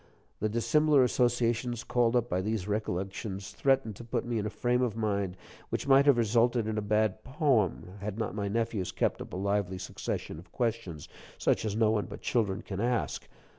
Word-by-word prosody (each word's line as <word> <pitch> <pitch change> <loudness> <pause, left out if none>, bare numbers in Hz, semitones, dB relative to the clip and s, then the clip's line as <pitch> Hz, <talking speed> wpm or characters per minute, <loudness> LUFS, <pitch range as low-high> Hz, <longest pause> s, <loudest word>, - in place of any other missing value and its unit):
The 110 - 0
dissimilar 145 +5 +4
associations 120 -1 +1
called 120 -1 +2
up 120 - +2
by 90 +1 0
these 105 -1 -2
recollections 100 -1 -3
threatened 135 -6 +1
to - - -9
put 115 - -2
me 120 -2 -1
in 105 - -2
a - - -2
frame 125 +3 0
of 120 -4 0
mind 100 -4 -1 0.3
which - - -3
might 135 +1 +6
have 140 -4 +6
resulted 120 +1 +3
in 110 0 -2
a 105 - 0
bad 105 0 +1
poem, 130 - +1
had 105 0 -4
not 110 -2 -2
my 100 -1 -2
nephews 110 -3 -1
kept - - 0
up - - -8
a - - -4
lively 100 -1 0
succession 90 -3 -5
of 90 +1 -15
questions 115 - -2 0.3
such - - +1
as 105 -1 -1
no 110 -1 +3
one 105 -2 0
but - - -9
children 100 -6 0
can 95 -2 -5
ask. 120 +1 -1
110 Hz, 195 wpm, -30 LUFS, 100-120 Hz, 0.3 s, might